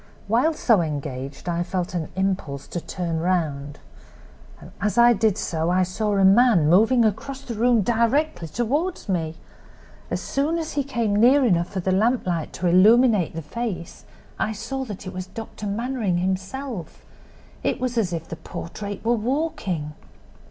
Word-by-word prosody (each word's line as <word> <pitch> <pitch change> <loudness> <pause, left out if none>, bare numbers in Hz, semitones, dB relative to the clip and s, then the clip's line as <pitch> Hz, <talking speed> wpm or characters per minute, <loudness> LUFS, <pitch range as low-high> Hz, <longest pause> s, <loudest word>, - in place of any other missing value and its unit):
While 250 +10 +2
so 225 - +3
engaged 140 -2 -5
I 170 0 0
felt 180 0 -3
an 170 -3 -3
impulse 190 -8 -2
to 175 - -4
turn 170 -3 -3
round. 150 -5 -1 1.0
As 210 +3 0
I 240 0 +7
did 215 -2 +1
so 160 0 -1
I 185 +1 +3
saw 205 +3 -1
a 195 - +4
man 200 -5 +5
moving 225 +8 +5
across 260 +6 -2
the 240 - -5
room 230 0 +3
directly 235 - +1
toward 280 - -2
me! 165 -4 -1 0.7
As - - -1
soon 295 +5 -1
as 325 -1 -4
he 285 - 0
came 235 -6 -1
near 255 +6 +5
enough 175 -6 +2
for 190 -2 -3
the 185 - 0
lamplight 190 -5 +1
to 185 - -4
illuminate 210 0 +5
the 165 - -4
face 200 -1 -5 0.3
I 220 - 0
saw 235 +6 -4
that 205 -4 -8
it 185 - -6
was 185 0 -5
Dr. 210 +1 -7
Mannering 220 -3 -1
himself; 190 - -4 0.6
it - - -1
was 250 -1 -2
as 215 -7 +1
if 165 -1 -4
the 165 - -7
portrait 200 +6 -7
were 235 - +3
walking! 220 - -2
200 Hz, 160 wpm, -23 LUFS, 175-240 Hz, 1.0 s, I